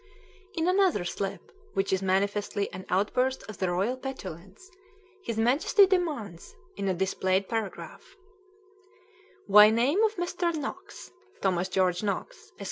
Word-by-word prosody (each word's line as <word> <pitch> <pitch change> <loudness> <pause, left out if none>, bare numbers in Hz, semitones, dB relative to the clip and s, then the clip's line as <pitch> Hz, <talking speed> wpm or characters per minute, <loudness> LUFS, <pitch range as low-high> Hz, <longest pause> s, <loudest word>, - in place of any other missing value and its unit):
In 330 0 0
another 370 - +2
slip, 195 +2 -5 0.2
which 195 0 0
is 190 - +1
manifestly 200 +1 -1
an 185 +1 -8
outburst 250 +7 0
of 215 - -9
the 185 - 0
royal 195 +8 0
petulance, 200 - -8 0.6
his 230 -8 -4
Majesty 265 - +4
demands, 300 - -2 0.2
in 195 - -3
a 190 - +1
"displayed" 190 +1 0
paragraph: 225 - -6 1.3
"Why 210 +1 +8
name 250 - +2
of 440 0 +2
Mr. 350 -1 -1
Knox 370 +7 -7 0.3
[Thomas 185 -1 0
George 180 -1 +1
Knox, 215 - -4
Esq. - - -27
210 Hz, 130 wpm, -28 LUFS, 190-300 Hz, 1.3 s, Why